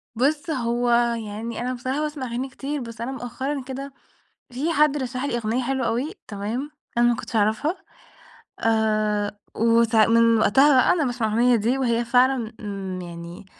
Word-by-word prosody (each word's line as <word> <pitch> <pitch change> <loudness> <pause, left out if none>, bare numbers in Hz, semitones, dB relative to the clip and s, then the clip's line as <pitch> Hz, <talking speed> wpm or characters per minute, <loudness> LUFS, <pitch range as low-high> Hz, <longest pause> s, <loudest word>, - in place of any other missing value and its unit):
بُص، 290 +6 0
هو 240 -3 0 0.4
يعني 220 +3 -5
أنا 250 +1 -2
بصراحة 260 +4 -3
باسمع 300 -3 -3
أغاني 245 +3 -3
كتير. 280 +2 -4
بس 230 -1 -8
أنا 240 +3 -3
مؤخرًا 265 +2 -4
كده 270 +1 -7 0.6
في 295 +7 -1
حد 300 -1 +3
رشَّح 255 -1 -3
لي 280 -4 -1
أغنية 235 +2 -1
حلوة 265 0 -1
أوي 255 +10 -1 0.2
تمام؟ 220 +8 -4 0.3
أنا 240 - +5
ما 240 - +2
كنتش 230 - -5
أعرفها، 220 - +1 0.8
آآ 215 -2 +1 0.2
وساع 230 -1 +4
من 230 0 +4
وقتها 270 +8 +5
بقى - - +4
أنا 330 -4 +1
باسمع 245 -3 -1
الأغنية 240 +3 +3
دي، 230 +5 0
وهي 240 -2 +1
فعلًا 250 -1 +2
امم 195 -3 -5
يعني 170 +1 -9
240 Hz, 165 wpm, -23 LUFS, 220-270 Hz, 0.8 s, أنا